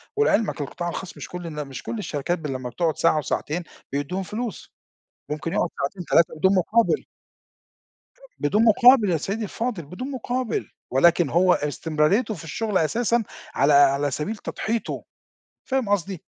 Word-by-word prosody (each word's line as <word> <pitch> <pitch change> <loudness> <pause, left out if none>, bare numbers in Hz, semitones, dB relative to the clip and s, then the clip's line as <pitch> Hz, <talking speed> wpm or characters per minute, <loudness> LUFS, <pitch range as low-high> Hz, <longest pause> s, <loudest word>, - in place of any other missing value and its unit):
ولعلمك 225 - +2
القطاع 175 +5 -4
الخاص 180 +1 -6
مش - - -7
كل 180 -1 -6
الن 150 -3 -5
مش 135 - -8
كل 230 - -4
الشركات 175 -2 -2
ب 155 - -5
لمّا 130 -2 -4
بتقعد 160 +6 -1
ساعة 160 -2 +3
وساعتين 155 +3 -2 0.3
بيدّوهم 145 +7 -2
فلوس، 225 +4 -6 0.6
ممكن 155 +2 -3
يقعد - - +1
ساعتين 175 +6 -3
3 165 0 +3
بدون 190 +5 +3
مقابل. 225 - +2 1.4
بدون 205 +10 +2
مقابل 230 -1 +6
يا 165 - +2
سيّدي 200 +8 -3
الفاضل، 215 -4 -3
بدون 185 - -6
مقابل 250 -2 -2 0.2
ولكن 170 +3 +4
هو 180 +1 +4
استمراريته 155 - +1
في 165 - -9
الشغل 205 +5 -1
أساسًا 230 +8 +1 0.3
على 140 +2 +4
على 140 0 +4
سبيل 155 - -3
تضحيته، 225 +2 -3 0.6
فاهم 260 -5 -1
قصدي؟ 195 -3 -1
180 Hz, 150 wpm, -24 LUFS, 150-220 Hz, 1.4 s, مقابل